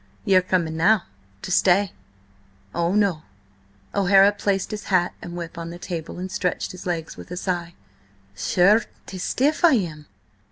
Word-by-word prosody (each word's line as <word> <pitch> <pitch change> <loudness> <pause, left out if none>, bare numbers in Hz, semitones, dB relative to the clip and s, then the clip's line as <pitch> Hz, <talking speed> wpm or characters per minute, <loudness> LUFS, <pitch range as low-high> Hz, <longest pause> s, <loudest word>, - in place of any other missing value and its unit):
Ye 195 - +3
are 185 - +7
coming 175 -3 -1
now–to 100 - -1
stay." 190 +2 +3 0.8
"Oh 170 +3 0
no!" 200 -7 +2 0.7
O'Hara 195 0 +5
placed 200 -1 -1
his 210 -1 -5
hat 180 -2 +2
and 175 0 -7
whip 170 0 -6
on 165 0 -5
the 170 - -8
table, 170 -3 -6
and 185 +1 -5
stretched 180 -2 -2
his 185 0 -9
legs 165 -2 -3
with - - -11
a 180 - -6
sigh. 175 -2 -3 0.6
"Sure, 180 - +4 0.2
'tis 185 -2 -7
stiff 290 - 0
I 345 - +7
am! 160 - -2
180 Hz, 160 wpm, -23 LUFS, 170-195 Hz, 0.8 s, are